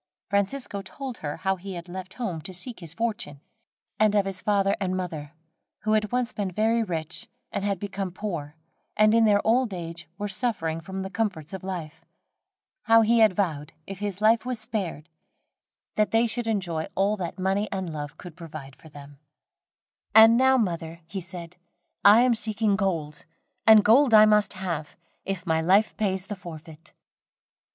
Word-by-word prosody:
Francisco 200 +1 -1
told 255 +6 -8
her 145 -1 -4
how 190 +2 -1
he 190 +1 -7
had 170 0 -8
left 185 +1 -8
home 190 -10 -4
to 185 +4 -6
seek 230 +7 -5
his 165 -4 -7
fortune, 225 -10 -3 0.6
and 215 -1 +4
of 200 -1 +3
his 190 -1 -3
father 200 -1 +2
and 185 -2 -1
mother, 160 -5 -5 0.5
who 215 - -1
had 215 -1 +1
once 250 -1 -1
been 200 -2 -2
very 220 +5 +1
rich, 165 -5 -4 0.2
and 200 - -3
had 200 -2 -1
become 195 -1 -4
poor, 170 -7 -5 0.4
and 215 0 +5
in 230 0 +5
their 205 -1 +3
old 230 -2 +2
age 170 -1 -7
were 205 0 -3
suffering 190 -7 -2
for 170 - -12
the 190 0 -4
comforts 195 -8 -3
of 190 - -6
life. 175 -5 -6 0.8
How 225 -1 +6
he 230 +1 +3
had 215 -4 +5
vowed, 155 -6 -2
if 195 -1 -8
his 205 -1 -4
life 220 +1 +4
was 250 -2 -2
spared, 200 -9 -3 0.9
that 215 0 +3
they 225 +1 +3
should 235 0 -1
enjoy 175 -7 -1
all 200 +2 +2
that 175 -3 -5
money 195 +3 0
and 190 -4 -3
love 150 +1 -6
could 175 -3 -11
provide 155 -6 -9
for 160 - -16
them. 145 -1 -13 1.0
"And 225 +1 +9
now, 260 +2 +4
mother," 170 -6 -2
he 185 +4 -6
said, 175 -1 -10 0.5
"I 210 +3 +8
am 250 -1 +4
seeking 215 -2 +1
gold, 165 -7 -2 0.4
and 220 -2 +8
gold 240 +2 +6
I 215 0 +9
must 210 -1 +3
have, 180 -5 -5 0.3
if 195 -2 -4
my 160 -2 +1
life 195 +6 +3
pays 190 -3 -1
the 205 0 -5
forfeit." 165 -2 -11
195 Hz, 175 wpm, -26 LUFS, 170-215 Hz, 1.0 s, And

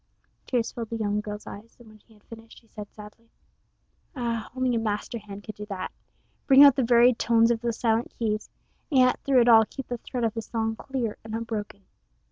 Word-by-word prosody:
Tears 240 -2 -1
filled 230 -2 -6
the 230 - -4
young 210 -1 -1
girl's 210 0 -7
eyes, 220 +3 -11
and 240 - -17
when 215 0 -17
he 220 +1 -24
had 210 - -25
finished 225 0 -13
she 230 - -29
said 210 -2 -10
sadly: 215 +2 -14 0.9
"Ah, 235 -3 -3
only 255 -1 0
a 230 - +1
master 220 +1 -3
hand 205 -1 -10
could 215 - -8
do 210 0 -9
that 190 -3 -5 0.6
bring 275 0 +8
out 280 -2 +8
the 270 - +1
varied 240 0 +4
tones 230 0 +3
of 230 -1 -1
those 235 -1 -2
silent 225 0 0
keys, 215 -2 -2 0.4
and 270 -5 +4
yet 255 0 +3
through 265 -3 +3
it 235 - +2
all 225 -2 +8
keep 270 +4 -9
the 245 -1 -4
thread 245 +1 -5
of 225 -2 0
the 225 - -4
song 225 0 -3
clear 245 -3 -4
and 220 0 -6
unbroken. 215 -3 -5
225 Hz, 220 wpm, -26 LUFS, 215-240 Hz, 0.9 s, bring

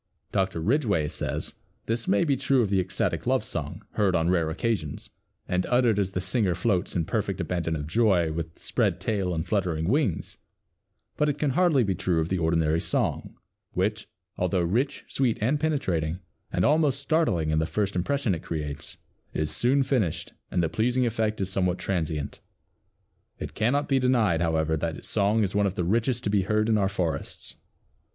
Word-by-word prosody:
Dr. 95 -4 0
Ridgway 105 - +1
says, - - -3 0.3
"This 115 0 -1
may 100 +1 +3
be 145 -4 +2
true 135 -2 +2
of 100 - -2
the 95 - +3
ecstatic 90 - -1
love - - +2
song, - - -5
heard 100 -4 +2
on 85 +1 +2
rare 85 -3 +2
occasions, 85 -3 -2 0.4
and 90 0 +1
uttered 120 -4 +3
as 100 -2 +1
the 90 - -1
singer 95 -1 +1
floats 90 -1 0
in 85 -3 +1
perfect - - -2
abandon 85 -2 -1
of 75 -1 -3
joy, 90 -2 +2
with 80 +1 -5
spread - - 0
tail 100 -5 -1
and 80 0 -2
fluttering 85 -6 0
wings, 125 - 0 0.8
but 150 - +2
it 145 - -1
can 150 -2 +1
hardly 160 -3 +3
be 100 -3 0
true 90 -2 0
of 80 +1 -1
the 95 - 0
ordinary 80 -1 +2
song, - - -1 0.4
which, 105 +4 -1 0.3
although 90 0 +1
rich, 120 +12 0
sweet 130 -4 0
and 130 +8 +1
penetrating, 90 - 0 0.3
and 90 - +1
almost 150 -3 +3
startling 140 - +1
in 80 - +2
the 80 - 0
first 100 +1 -1
impression 115 +4 0
it 80 - -4
creates, 75 -3 -5 0.4
is 75 -1 -1
soon 135 +3 +3
finished 125 - -1 0.2
and 90 - +1
the - - +2
pleasing 120 +10 +1
effect 110 -2 -1
is 95 0 -2
somewhat 90 -1 +1
transient. 80 -6 -2 1.0
It - - -6
cannot 140 +6 +1
be 135 -1 +3
denied, 115 -10 +2
however, 80 -1 +1
that 80 0 -2
its - - -10
song 105 +1 +2
is 95 - -1
one 100 -1 +3
of 95 - -3
the 90 - -1
richest 115 +6 +1
to 105 - 0
be 100 -1 +3
heard 105 +3 +1
in 110 - +4
our 95 -1 +2
forests." 90 -5 -3
95 Hz, 185 wpm, -26 LUFS, 85-120 Hz, 1.0 s, in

